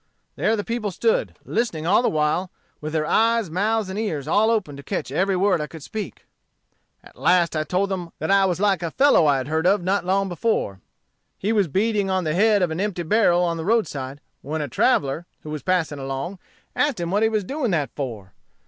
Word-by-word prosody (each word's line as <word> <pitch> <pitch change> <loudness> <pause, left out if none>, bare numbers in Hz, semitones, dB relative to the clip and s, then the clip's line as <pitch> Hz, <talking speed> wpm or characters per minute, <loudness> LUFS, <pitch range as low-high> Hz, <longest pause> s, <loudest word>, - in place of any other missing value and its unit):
There 225 - +1
the 205 - -3
people 230 -2 -2
stood, 465 - 0
listening 195 -10 -2
all 180 - +4
the 245 - +2
while, 155 +4 0 0.3
with 155 0 -4
their 155 -1 0
eyes, 225 -1 +2
mouths, 210 +4 0
and 190 +2 -4
ears 155 -11 -3
all 210 +7 +3
open 210 -11 0
to 140 - -9
catch 135 - -4
every 190 +6 +1
word 185 -3 +2
I 150 - -3
could 160 -2 -11
speak. 215 +5 -6 0.8
"At - - -17
last 175 -2 +3
I 155 - +1
told 185 +5 0
them 180 -3 -3
I 195 +5 +3
was 180 -2 0
like 200 -2 +2
a 170 - -2
fellow 265 - +4
I 140 -2 +4
had 130 0 -4
heard 160 +3 +1
of 195 -1 +3
not 190 +2 +1
long 195 +2 +1
before. 175 - -1 0.6
He 210 +4 -1
was 205 -4 +2
beating 200 +4 0
on 190 -1 +1
the 155 -2 -1
head 205 +2 +3
of 175 - 0
an 160 - -3
empty 195 -4 -2
barrel 180 -1 +3
on 170 -1 0
the 160 - -4
roadside, 145 - -1 0.2
when 155 +3 -4
a - - -4
traveller, 140 +6 +1 0.2
who 150 - -7
was 150 -1 -4
passing 170 -6 0
along, 135 +8 -4 0.4
asked 290 -8 +1
him 170 0 -3
what 205 +2 +2
he 220 - +4
was 215 -2 0
doing 270 +4 -2
that 155 -7 0
for? 110 -9 -6
180 Hz, 220 wpm, -23 LUFS, 155-210 Hz, 0.8 s, all